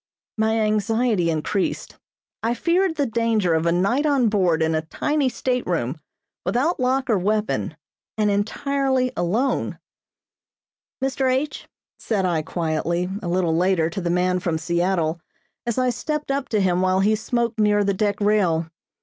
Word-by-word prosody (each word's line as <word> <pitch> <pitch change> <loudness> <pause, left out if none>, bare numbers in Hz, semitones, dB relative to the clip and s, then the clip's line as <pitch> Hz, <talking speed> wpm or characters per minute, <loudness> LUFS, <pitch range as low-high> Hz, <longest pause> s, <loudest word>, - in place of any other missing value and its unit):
My 220 0 +1
anxiety 215 -2 +1
increased. 165 +5 -2 0.4
I 230 +2 0
feared 345 +6 +1
the 285 - +1
danger 225 -6 +1
of 160 +1 +1
a - - +3
night 200 - +1
on 270 -6 +3
board 180 -6 +2
in 160 0 +1
a 155 - +1
tiny 285 - 0
stateroom, 175 - -2 0.4
without 255 - 0
lock 260 +1 +1
or 220 -6 +2
weapon, 210 -5 -1 0.4
and 210 -1 +2
entirely 260 +5 0
alone. 220 +11 0 1.3
"Mr. 265 -1 +1
H 275 +4 -2 0.2
," - - -61
said 200 -4 -1
I 170 -3 +1
quietly, 170 +3 -2
a 180 - -5
little 170 -2 +1
later, 170 -2 +2
to 195 - -4
the 170 - -2
man 180 +1 +1
from 170 -3 -1
Seattle, 170 0 0 0.5
as 235 - -1
I 255 -1 +2
stepped 300 +4 -3
up 275 0 -2
to 215 - +1
him 180 -1 +2
while 185 0 +2
he 215 +2 +3
smoked 235 +1 -2
near 210 -1 +3
the 200 0 +1
deck 205 +1 0
rail. 180 -6 +1
205 Hz, 160 wpm, -23 LUFS, 175-250 Hz, 1.3 s, a